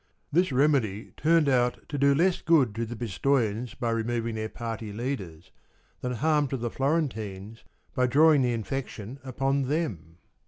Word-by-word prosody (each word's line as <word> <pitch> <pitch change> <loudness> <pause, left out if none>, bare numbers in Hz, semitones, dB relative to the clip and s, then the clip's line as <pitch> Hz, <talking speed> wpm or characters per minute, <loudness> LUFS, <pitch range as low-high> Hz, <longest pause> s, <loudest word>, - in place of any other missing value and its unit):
This 175 +2 +2
remedy 125 -7 +1
turned 160 0 +3
out 125 -2 +1
to 145 - -5
do 140 0 +4
less 175 +4 +2
good 145 -10 +3
to 115 +1 -3
the 120 - -6
Pis 115 -4 -6
toians 120 -4 0
by 120 -1 0
removing 115 0 -1
their 110 0 -3
party 115 -2 -5
leaders, 100 - -5 0.5
than 125 0 -3
harm 150 +4 +2
to 135 - -3
the 120 -1 -3
Florentines 115 - -2 0.3
by 125 0 +2
drawing 150 +2 +5
the 125 -1 +2
infection 120 +1 -5
upon 135 +1 0
them. 100 - -3
125 Hz, 160 wpm, -27 LUFS, 110-140 Hz, 0.5 s, drawing